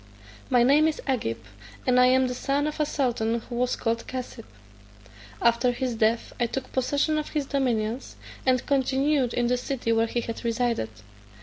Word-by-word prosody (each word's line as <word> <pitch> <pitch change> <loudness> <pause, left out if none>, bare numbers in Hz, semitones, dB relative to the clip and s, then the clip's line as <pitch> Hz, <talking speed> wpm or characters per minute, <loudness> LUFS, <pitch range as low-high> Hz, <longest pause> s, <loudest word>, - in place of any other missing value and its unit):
My 245 -2 +4
name 290 +5 +5
is 315 - -2
Agib, 235 - -1 0.5
and 250 0 +4
I 250 - +7
am 260 +1 +4
the 250 - -3
son 275 +3 0
of 305 0 -4
a 300 - +2
sultan 235 -5 0
who 240 - -10
was 250 0 +1
called 230 -1 -2
Cassib. 255 -2 -6 0.9
After 235 +1 +3
his 250 0 -2
death 225 +1 0
I 240 - +2
took 260 +2 -5
possession 285 +4 +1
of 300 - -5
his 300 -3 -2
dominions, 245 -3 -1 0.3
and 255 -1 +2
continued 270 -1 +1
in 240 - 0
the 250 +1 +2
city 250 -2 -2
where 225 0 +3
he 240 +1 -1
had 230 -1 -6
resided. 235 - 0
250 Hz, 180 wpm, -26 LUFS, 235-270 Hz, 0.9 s, I